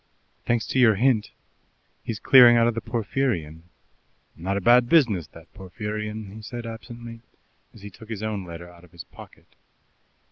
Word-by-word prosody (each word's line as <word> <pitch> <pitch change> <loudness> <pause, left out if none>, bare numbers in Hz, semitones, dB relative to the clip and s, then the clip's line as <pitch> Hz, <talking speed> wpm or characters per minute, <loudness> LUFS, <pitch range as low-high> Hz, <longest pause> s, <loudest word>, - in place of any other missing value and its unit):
"Thanks 120 -1 0
to 130 - 0
your 115 -4 +5
hint, 115 -1 +1 0.7
he's 115 - -5
clearing 120 0 +7
out 115 - +4
of 120 - +1
the 115 - -4
Porphyrion." 110 - -3 0.7
"Not 95 +4 -3
a - - 0
bad 120 +4 +4
business 110 - +3
that 80 +1 -17
Porphyrion," 105 +2 -6
he 110 - -10
said 120 +2 -8
absently, 115 0 -9 0.5
as 105 - -17
he 105 - -9
took 110 +4 -15
his 110 -2 -6
own 105 -3 -3
letter 85 0 -10
out 90 0 -17
of 90 -1 -20
his 85 -3 -10
pocket. - - -16
110 Hz, 170 wpm, -24 LUFS, 95-120 Hz, 0.7 s, clearing